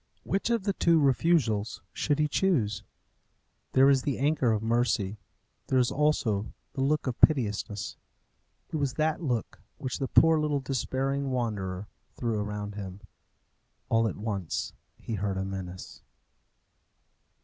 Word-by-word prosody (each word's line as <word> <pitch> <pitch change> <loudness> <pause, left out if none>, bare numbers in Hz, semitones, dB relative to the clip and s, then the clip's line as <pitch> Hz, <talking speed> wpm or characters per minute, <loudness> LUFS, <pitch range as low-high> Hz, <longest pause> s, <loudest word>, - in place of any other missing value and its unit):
Which 195 +4 -1
of 230 -4 +1
the 200 0 0
two 170 -3 +4
refusals 130 -6 +2
should 145 -2 0
he 150 0 +2
choose? 125 - +1 0.9
There 135 +1 +6
is 135 -1 +5
the 140 0 -1
anchor 140 -3 +2
of 110 -1 0
mercy. 110 -3 +1 0.5
There 130 - +2
is 125 -2 +3
also 130 -8 +1 0.2
the 135 - -3
look 150 +3 +1
of 130 -3 -3
piteousness. 105 -7 +2 0.7
It - - -1
was 140 -4 0
that 155 +1 0
look 120 - -2 0.2
which 130 -4 -4
the 135 - -1
poor 160 +2 +5
little 150 -2 +1
despairing 135 +1 -1
wanderer 105 -6 -2 0.3
threw 115 -3 -1
around 105 0 -4
him. 100 -1 -7 0.9
All 115 0 +3
at - - -4
once 100 -5 -3 0.2
he 115 - -6
heard 100 -1 -1
a 95 - -1
menace. 95 -2 -7
125 Hz, 140 wpm, -28 LUFS, 105-145 Hz, 0.9 s, There